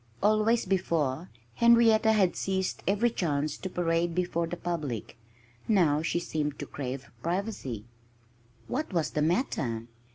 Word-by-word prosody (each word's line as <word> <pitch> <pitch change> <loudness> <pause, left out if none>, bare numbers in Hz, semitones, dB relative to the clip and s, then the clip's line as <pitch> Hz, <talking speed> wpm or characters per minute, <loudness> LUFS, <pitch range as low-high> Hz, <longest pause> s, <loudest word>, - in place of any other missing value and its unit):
Always, 215 +2 +3
before, 170 -5 0 0.2
Henrietta 230 - +5
had 195 -5 +3
seized 190 -1 -1
every 210 +5 +2
chance 150 -7 -1
to 190 - -5
parade 170 -1 0
before 175 -2 0
the 175 - -5
public. 155 - -4 0.5
Now 165 -9 +3
she 165 +1 0
seemed 150 -4 -2
to - - -5
crave 135 -1 -6
privacy. 170 - -3 0.8
What 300 +1 -2
was 165 -3 0
the 150 - -1
matter? 140 - 0
175 Hz, 130 wpm, -29 LUFS, 150-205 Hz, 0.8 s, Henrietta